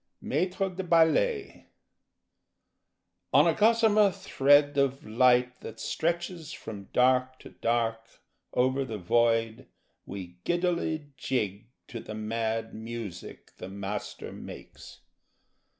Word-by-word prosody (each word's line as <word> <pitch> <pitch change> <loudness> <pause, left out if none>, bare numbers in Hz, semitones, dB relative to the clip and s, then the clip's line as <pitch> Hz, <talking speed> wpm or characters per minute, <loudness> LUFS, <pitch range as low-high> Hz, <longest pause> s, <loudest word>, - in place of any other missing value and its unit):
Maître 185 0 -1
de - - -1
Ballet 180 - +2 1.6
On - - +6
a - - +4
gossamer 215 -1 +4
thread 145 -2 +3
Of 135 -1 +1
light 125 +2 +3
that - - -9
stretches 170 -1 -2
From 105 - -8
dark 130 +1 +3
to - - -12
dark 115 -1 0 0.5
Over 130 +2 +1
the 115 -5 -5
void 115 +3 +1 0.4
We 90 -3 -8
giddily 170 -4 -1
jig 105 -5 -2 0.2
To 120 - -6
the 110 - -8
mad 110 +1 -2
music 110 -5 -8
The 90 - -8
Master 100 +1 -5
makes. - - -11
125 Hz, 105 wpm, -28 LUFS, 110-165 Hz, 1.6 s, On